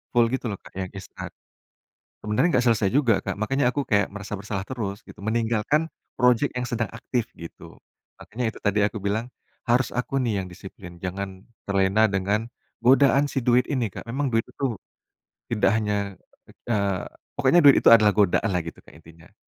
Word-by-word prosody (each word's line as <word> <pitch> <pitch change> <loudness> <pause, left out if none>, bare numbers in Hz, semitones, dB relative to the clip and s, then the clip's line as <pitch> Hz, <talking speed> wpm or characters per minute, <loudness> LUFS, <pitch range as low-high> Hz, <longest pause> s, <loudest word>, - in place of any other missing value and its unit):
full 115 0 +4
gitu 130 -1 -2
loh 105 - -3
Kak, 95 - -10
yang 95 - -2
instan. 95 - -8 1.0
Sebenarnya 125 +10 +2
nggak 125 - 0
selesai 105 -4 +3
juga, 120 -6 +2
Kak, - - -4
makannya 125 +4 +1
aku 140 +1 -3
kayak 105 -4 +2
merasa 105 0 -7
bersalah 100 -1 -4
terus, 105 -6 -4
gitu. - - -13
Meninggalkan 115 +7 0 0.3
projek 125 +2 +3
yang 125 - -2
sedang 115 -2 -2
aktif, 115 0 -3
gitu. 85 -1 -11 0.4
Makannya 115 +1 -3
itu - - -13
tadi 105 0 +1
aku 105 +1 0
bilang, 105 +5 -2 0.4
harus 125 +2 +2
aku 125 +2 -2
nih 110 -6 0
yang 90 - -8
disiplin, 85 0 -11
jangan 95 +1 -5 0.2
terlena 100 +2 +3
dengan 100 +4 -1 0.3
godaan 135 +3 +5
si - - -2
duit 125 +1 +3
ini, 130 -5 0
Kak. - - -7
Memang 135 +4 -1
duit 115 0 +3
itu 135 -4 -3 0.8
tidak 115 -3 +2
hanya 100 -2 -2 0.5
eee, 100 -5 0 0.3
pokoknya 175 - +4
duit 140 -2 +8
itu - - +5
adalah 105 -2 +6
godaan 105 +2 +2
lah 90 - +1
gitu 80 - -9
Kak, - - -17
intinya. 80 +3 -18
110 Hz, 175 wpm, -24 LUFS, 100-125 Hz, 1.0 s, duit